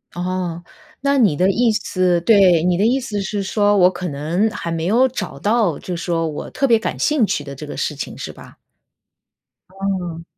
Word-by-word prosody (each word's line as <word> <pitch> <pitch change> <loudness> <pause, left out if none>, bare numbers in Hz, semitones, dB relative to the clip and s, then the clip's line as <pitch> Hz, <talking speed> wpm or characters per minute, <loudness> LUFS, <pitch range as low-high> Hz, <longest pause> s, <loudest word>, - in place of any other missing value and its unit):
哦， 175 -1 -3 0.4
那 280 0 +2
你 205 - +4
的 185 +5 +2
意 235 +2 +2
思 185 -4 0
对， 185 -5 +5
你 180 0 +2
的 205 - +2
意 255 +4 +2
思 210 -6 -4
是 200 +1 -3
说， 205 +1 +2
我 180 -1 +6
可 180 0 -5
能 165 +8 0
还 170 -6 -5
没 165 0 -2
有 240 +7 +4
找 260 - -5
到， 210 -7 +1
就 180 - -5
说 165 -1 -1
我 150 - -6
特 275 - -1
别 230 -2 +4
感 - - -3
兴 295 -7 +2
趣 145 - -2
的 140 -1 -8
这 150 +2 -9
个 - - -7
事 150 - -2
情， 145 - -6
是 - - -6
吧？ - - -15 1.1
嗯。 185 -3 -4
185 Hz, 215 characters per minute, -19 LUFS, 170-215 Hz, 1.1 s, 我